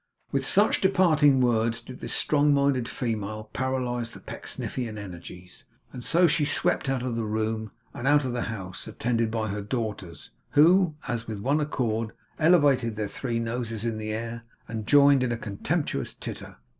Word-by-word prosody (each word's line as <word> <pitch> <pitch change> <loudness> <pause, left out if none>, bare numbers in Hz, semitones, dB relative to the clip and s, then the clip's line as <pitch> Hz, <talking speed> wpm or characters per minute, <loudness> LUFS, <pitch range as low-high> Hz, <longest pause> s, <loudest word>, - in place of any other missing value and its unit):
With 135 -1 0
such 205 +2 +3
departing 155 -8 +4
words, 115 -2 +2
did 125 +2 -11
this - - -3
strong 145 -1 +3
minded 140 -4 +1
female 110 -3 -4
paralyse 125 -3 -1
the - - -10
Pecksniffian 115 -4 -5
energies; 90 -2 -10 0.3
and 125 - -7
so 175 +7 +4
she 165 -2 +2
swept 150 -1 0
out 130 -2 0
of 125 -2 -2
the 115 - -1
room, 110 0 -2 0.2
and 125 - -4
out 145 -1 +4
of 125 - -2
the 125 - -1
house, 95 -4 -6
attended 115 +1 0
by 110 -1 -2
her 105 +1 -3
daughters, 105 - -5 0.2
who, 170 +2 +5
as 115 -2 -3
with 110 -2 -5
one 140 +8 +1
accord, 115 -7 -1 0.3
elevated 145 -9 +4
their 105 -1 -3
three 120 -3 -3
noses 115 -1 -3
in 115 -2 -2
the 110 0 -4
air, 115 +2 -4 0.3
and 110 -1 -5
joined 140 0 +6
in 125 -1 0
a 120 - -1
contemptuous 105 -3 -2
titter. - - -7
120 Hz, 170 wpm, -26 LUFS, 110-140 Hz, 0.3 s, joined